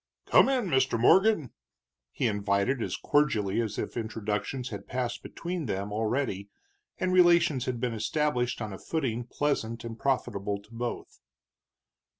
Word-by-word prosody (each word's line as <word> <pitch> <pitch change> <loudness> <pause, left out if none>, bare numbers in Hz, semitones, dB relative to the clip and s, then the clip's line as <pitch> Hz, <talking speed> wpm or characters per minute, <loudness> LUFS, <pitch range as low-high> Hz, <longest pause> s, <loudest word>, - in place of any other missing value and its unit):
"Come - - +5
in, 255 -4 +1
Mr. 130 -8 +2
Morgan," 185 - +4 0.6
he - - -2
invited, 105 +3 +1
as - - -2
cordially 115 -8 +1
as 110 -3 -3
if - - -4
introductions 110 +2 -3
had 100 -2 -7
passed 125 -1 -3
between 170 -4 -5
them 100 0 -3
already 110 -2 -1 0.5
and 185 0 0
relations 170 -7 +5
had 125 -2 -2
been 120 -1 -1
established 125 +1 0
on 105 -2 -5
a 95 - -8
footing 125 -7 -2
pleasant 120 -4 -2
and 115 -1 -7
profitable 105 -7 -1
to 105 +3 -19
both. 120 +1 -5
120 Hz, 145 wpm, -28 LUFS, 105-140 Hz, 0.6 s, Come